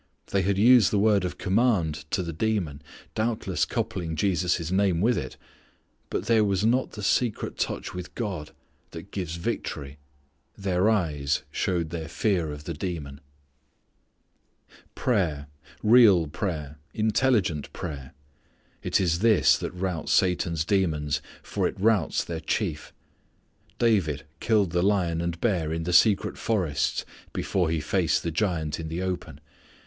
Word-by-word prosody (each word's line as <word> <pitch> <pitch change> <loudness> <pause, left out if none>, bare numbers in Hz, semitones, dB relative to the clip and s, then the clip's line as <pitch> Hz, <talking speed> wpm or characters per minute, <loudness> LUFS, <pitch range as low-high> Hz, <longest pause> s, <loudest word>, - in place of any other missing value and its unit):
They 100 - +2
had 95 +1 0
used 120 0 +6
the 105 - +1
word 100 -1 +3
of 90 - -3
command 95 -8 +1
to 95 - 0
the 85 -1 -5
demon, 85 -6 -1 0.3
doubtless 110 -6 0
coupling 80 -3 -3
Jesus' 90 -1 0
name 95 -3 +2
with 115 +6 +3
it. 65 -3 -5 0.7
But - - -2
there 110 -1 +4
was 100 0 +1
not 125 +3 +1
the 105 - -7
secret 115 +2 0
touch - - -3
with 90 -1 -7
God 95 -10 -4 0.4
that - - -10
gives 90 -4 -4
victory. 75 -4 -4 0.6
Their 95 +1 +1
eyes 75 -10 0
showed 85 -3 -1
their 80 -2 -4
fear 85 -4 0
of 75 0 -8
the 85 - -4
demon. 75 -4 -5 1.7
Prayer, 85 - 0 0.4
real 105 -7 +6
prayer, 75 -2 -4 0.2
intelligent 110 - +1
prayer, 70 -3 -7 0.7
it - - +1
is 85 -3 +1
this 110 -1 +5
that - - -3
routs 90 -3 -3
Satan's 85 -3 +2
demons, 75 -7 0 0.2
for - - -1
it - - -7
routs 105 -5 +2
their 85 -2 -5
chief. 80 - -2 0.9
David 90 - +1 0.2
killed 105 -6 +2
the 90 0 +1
lion 90 -4 +1
and 85 -1 -3
bear 90 -9 0
in 80 0 -2
the 90 +2 -2
secret 100 +2 +4
forests 90 -10 0 0.3
before 90 -4 0
he 80 -1 0
faced 80 +1 +1
the 85 - -2
giant 80 -4 -1
in 80 - -5
the 85 +3 -3
open. 85 -6 -4
90 Hz, 145 wpm, -26 LUFS, 80-105 Hz, 1.7 s, used